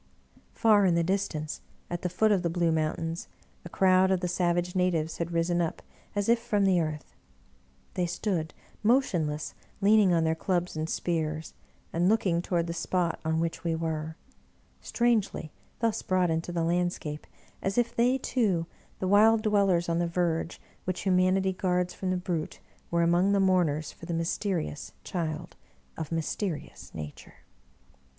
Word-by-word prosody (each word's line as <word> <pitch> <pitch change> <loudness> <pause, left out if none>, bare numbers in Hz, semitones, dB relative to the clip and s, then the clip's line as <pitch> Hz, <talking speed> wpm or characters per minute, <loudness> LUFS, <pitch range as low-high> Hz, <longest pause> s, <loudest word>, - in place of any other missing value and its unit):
Far 210 -4 +5
in 175 - +3
the 170 - +2
distance, 170 -5 -2 0.3
at 175 0 -4
the 180 - -1
foot 215 +5 +2
of 195 -3 +3
the 170 - 0
blue 170 0 +1
mountains, 160 +1 -2 0.4
a 175 - -8
crowd 185 +1 +4
of 190 -1 +2
the 180 - 0
savage 175 0 0
natives 170 -3 0
had 170 0 -1
risen 170 +1 +1
up 165 - -3 0.3
as 205 -1 0
if 235 0 +4
from 210 -4 +1
the 185 -3 +4
earth; 155 -2 -5 0.8
they 180 -1 0
stood 170 -3 -2 0.3
motionless 175 - +1 0.3
leaning 205 -1 +5
on 165 -2 +3
their 160 0 +2
clubs 175 +1 -1
and 155 +1 -2
spears, 160 -2 -2 0.4
and 175 +3 +2
looking 190 -6 +2
toward 175 -1 0
the 170 - -3
spot 170 0 -1
on 160 0 0
which 165 +1 -2
we 165 -1 0
were 160 -1 -3 0.3
— - - -36
strangely 225 -9 +1 0.3
thus 225 -1 +1
brought 185 -2 +1
into 165 +2 -2
the 170 -1 -1
landscape, 170 -3 -1 0.3
as 195 +3 -2
if 235 -1 +1
they 245 +3 +3
too, 205 -11 0 0.3
the 185 - -2
wild 215 +3 +5
dwellers 195 -5 +3
on 170 0 +1
the 175 - +1
verge 170 -1 -1 0.3
which 185 -1 -2
Humanity 190 0 +2
guards 180 -1 0
from 190 - -4
the 185 - +1
Brute, 175 -3 -3 0.3
were 170 0 +2
among 175 +4 +3
the 200 - +3
mourners 175 -6 +2
for 165 - -12
the 170 - -2
mysterious 165 -2 -2
Child 165 -3 -4 0.4
of 160 -1 -5
mysterious 165 +1 -3
Nature 75 -2 -9
175 Hz, 165 wpm, -28 LUFS, 165-190 Hz, 0.8 s, Far